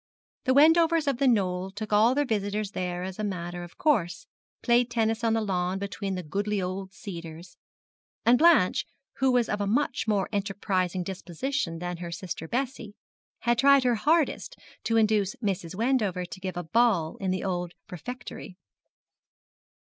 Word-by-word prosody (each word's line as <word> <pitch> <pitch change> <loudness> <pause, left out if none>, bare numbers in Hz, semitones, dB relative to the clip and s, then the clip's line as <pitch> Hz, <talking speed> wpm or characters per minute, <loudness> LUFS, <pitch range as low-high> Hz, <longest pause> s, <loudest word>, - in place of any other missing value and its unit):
The 260 0 +3
Wendovers 325 +2 +5
of 270 -3 0
The 275 - +3
Knoll 190 -5 +1
took 210 +2 -6
all 225 +5 +5
their 290 0 +2
visitors 210 -3 -2
there 180 -2 -3
as 190 +2 -6
a - - -2
matter 175 -3 -4
of 175 - -12
course 175 - +1 0.4
played 240 0 +3
tennis 225 -1 0
on 225 -1 +2
the 225 - +1
lawn 185 -2 -1
between 200 0 -4
the 180 - -4
goodly 200 +6 -2
old 190 +1 -4
cedars; 170 -3 -9 0.7
and 240 +1 +5
Blanche, 315 - +4 0.3
who 265 -1 +3
was 245 -2 +2
of 205 - -2
a 200 - 0
much 270 +4 0
more 205 -3 +1
enterprising 195 -3 -1
disposition 185 - -3
than 175 +1 -4
her 170 0 -6
sister 170 -1 -6
Bessie, 240 - -3 0.5
had 240 -1 +1
tried 280 -1 +6
her 250 -1 +3
hardest 315 - +1 0.3
to 230 - +2
induce 215 -3 +2
Mrs. 190 -5 -3
Wendover 215 -6 0
to 185 - -9
give 185 -1 -5
a 175 - -3
ball 190 -4 +2
in 195 - -3
the 185 0 -1
old 180 -2 -2 0.2
refectory. 185 0 -8
205 Hz, 165 wpm, -27 LUFS, 180-240 Hz, 0.7 s, tried